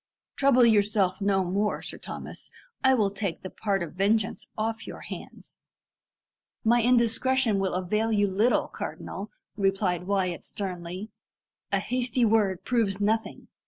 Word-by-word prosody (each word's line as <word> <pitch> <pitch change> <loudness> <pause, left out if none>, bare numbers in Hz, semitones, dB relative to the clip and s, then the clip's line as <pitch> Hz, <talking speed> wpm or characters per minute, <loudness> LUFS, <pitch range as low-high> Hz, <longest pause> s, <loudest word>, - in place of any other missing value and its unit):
"Trouble 270 -3 +5
yourself 205 -3 +3
no 195 -1 +2
more, 200 +4 0
Sir - - -5
Thomas. - - -7 0.3
I 265 0 +6
will 205 -5 +2
take 195 -4 -4
the 185 - -6
part 195 -4 -1
of 170 - -7
vengeance 205 +4 0
off 225 +1 -2
your - - -8
hands." - - -10 1.0
"My 235 +1 +4
indiscretion 240 -1 +3
will 190 -2 0
avail 210 +5 0
you 205 -1 +3
little, 205 +6 +2
cardinal," - - -6 0.3
replied 195 -3 0
Wyat 190 -3 0
sternly. 185 +1 -5 0.6
"A - - +3
hasty 250 -1 0
word 210 -4 +2
proves 220 -5 +1
nothing. 220 +2 -1
205 Hz, 135 wpm, -27 LUFS, 190-225 Hz, 1.0 s, I